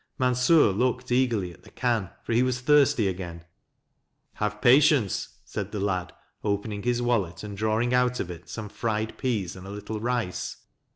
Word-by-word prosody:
Mansur 125 0 +4
looked 125 +4 -1
eagerly 115 -8 +1
at - - -19
the - - -16
can, 115 -7 0
for - - -2
he 120 - +4
was 125 -1 +1
thirsty 145 -5 +4
again. 90 -3 -5 0.5
" - - -49
Have 105 0 -1
patience," 130 - +4
said 100 0 -5
the 105 - -3
lad, 95 -3 -1 0.3
opening 100 0 -2
his 120 +2 0
wallet, 100 -8 0
and 105 -1 -6
drawing 110 +4 +1
out 125 0 +2
of 90 - -3
it 85 0 -11
some 110 -2 -5
fried 110 +1 -2
peas 105 -9 -1
and 95 +1 -10
a - - -8
little 105 +2 -5
rice. 120 -5 -2
110 Hz, 175 wpm, -26 LUFS, 100-125 Hz, 0.5 s, Mansur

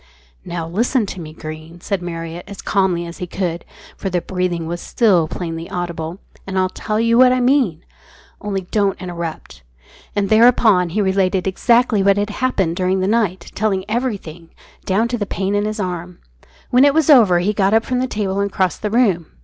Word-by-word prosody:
"Now, 170 -2 -5
listen 230 - +1
to 190 -2 -7
me, 155 -1 -8
Greene," 155 +2 -9
said 195 +1 -3
Marriott, 165 0 -6
as 200 - -9
calmly 190 -4 +1
as 170 0 -9
he 180 - -4
could, 175 -2 -3 0.3
for 195 - -4
the 180 -1 0
breathing 180 -2 -2
was 175 +1 -4
still 190 -9 +2
plainly 165 0 -5
audible, 170 -1 -4 0.3
"and 190 -1 -3
I'll 185 0 +2
tell 215 +3 -3
you 230 +1 +3
what 255 -1 +7
I 255 - +2
mean, 245 - +1 0.6
only 200 -2 -2
don't 200 +1 -1
interrupt." 170 - -6 0.5
And 200 -1 0
thereupon 220 -5 +5
he 210 +6 -1
related 190 -1 +1
exactly 230 +2 +2
what 200 0 +3
had 205 +1 -1
happened 195 -9 -1
during 185 0 +1
the 185 - 0
night, 200 -5 0
telling 195 -3 -1
everything, 215 -8 -2
even - - -29 0.3
down 205 +5 +1
to 240 -1 -2
the 205 - -2
pain 195 +1 -2
in 205 0 +1
his 215 +1 -3
arm. 180 -2 -4 0.5
When 250 +2 +5
it 285 0 +4
was 320 -1 +4
over 215 -10 +6
he 185 +5 0
got 200 0 +2
up 225 - +2
from 250 -1 -1
the 255 - 0
table 200 -4 -2
and 200 0 -1
crossed 185 -1 -1
the 210 - -1
room. 200 -8 +2
190 Hz, 200 wpm, -19 LUFS, 175-215 Hz, 0.6 s, what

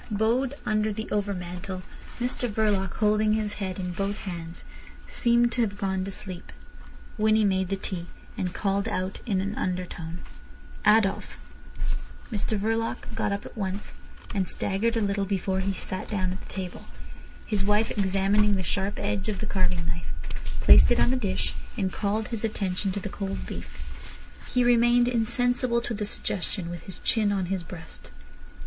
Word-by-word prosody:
Bowed 235 +6 +2
under 215 0 +2
the 220 +1 -3
overmantel, 185 -2 -2 0.4
Mr 245 0 0
Verloc, 205 -4 +1
holding 215 0 +3
his 215 -1 0
head 190 -2 -2
in 180 -1 -2
both 195 +3 -1
hands, 170 -3 -6 0.4
seemed 235 0 +3
to 240 - +1
have 205 -3 0
gone 190 -2 0
to 195 - -4
sleep. 185 -2 -6 0.7
Winnie 215 0 +5
made 190 -2 +2
the 195 - +1
tea, 185 -2 -4 0.3
and 180 - -1
called 200 +2 0
out 185 -1 -2
in 195 -4 +2
an 200 +2 -2
undertone: 180 -3 -3 0.7
"Adolf." 210 -2 +4 0.9
Mr 215 0 0
Verloc 225 +2 -1
got - - 0
up 200 0 -2
at - - -10
once, 195 -2 -3 0.4
and 190 -3 +1
staggered 225 +4 +1
a - - +2
little 200 -1 +1
before 190 -1 0
he 195 +1 +1
sat 185 -1 -5
down 185 -4 0
at 185 - -5
the - - -12
table. 185 -2 -5 0.6
His 205 -3 0
wife 210 +2 +3
examining 200 +1 +3
the 190 - -1
sharp 195 +3 0
edge 205 0 -1
of 205 - -1
the 215 - -3
carving 180 -4 +1
knife, 165 0 -3 0.5
placed 65 0 +9
it - - +4
on - - +4
the - - +3
dish, 215 -7 0 0.2
and 190 -1 0
called 215 +1 0
his 230 -3 -4
attention 195 -3 0
to 200 - -2
the 200 - -4
cold 195 0 -4
beef. - - -7 0.7
He 250 - +3
remained 240 0 +5
insensible 245 +1 +2
to 240 - -3
the 210 -1 -2
suggestion, 185 -3 -3
with 175 - -7
his 190 - -8
chin 215 -3 +3
on 195 -2 +1
his 190 - -1
breast. 165 -1 -10
200 Hz, 170 wpm, -27 LUFS, 185-215 Hz, 0.9 s, placed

